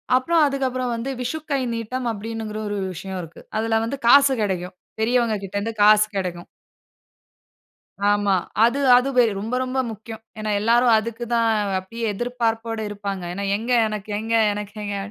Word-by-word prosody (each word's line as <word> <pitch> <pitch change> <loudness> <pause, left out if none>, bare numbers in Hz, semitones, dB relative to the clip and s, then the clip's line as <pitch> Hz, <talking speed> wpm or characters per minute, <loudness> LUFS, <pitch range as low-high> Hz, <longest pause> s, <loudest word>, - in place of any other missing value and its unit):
அப்புறம் 325 +6 +3
அதுக்கப்புறம் 255 -2 -1
வந்து 230 +4 -4
விஷுக்கை 290 +2 -2
நீட்டம் 230 +3 -4
அப்படிங்கிற 220 0 -5
ஒரு 205 0 -3 0.2
விஷயம் 190 +1 -6
இருக்கு. 165 -1 -11 0.2
அதில 225 0 +1
வந்து 265 +5 -3
காசு 275 +2 +7
கெடைக்கும். 185 -2 -2 0.2
பெரியவங்ககிட்ட 220 -4 0
இருந்து 225 +3 -3
காசு 210 0 +7
கெடைக்கும். 180 -3 -3 1.6
ஆமா. 205 -1 +3 0.3
அது, 240 +4 +3 0.2
அது 250 +2 +3 0.3
ரொம்ப 225 +5 -5
ரொம்ப 255 +1 -2
முக்கியம். 220 +1 -9 0.2
ஏனா, 215 0 -3
எல்லாரும் 235 +2 +4
அதுக்கு 230 +2 -3
தான் 230 -1 +3 0.3
அப்படியே 230 +5 -8
எதிர்பார்ப்போட 230 0 -2
இருப்பாங்க. 200 -2 -5
ஏனா, 200 +2 -4
எங்க 230 +4 -4 0.2
எனக்கு 215 -1 -6
எங்க, 225 +1 -3 0.2
எனக்கெங்க. 205 0 -5
225 Hz, 140 wpm, -22 LUFS, 205-245 Hz, 1.6 s, காசு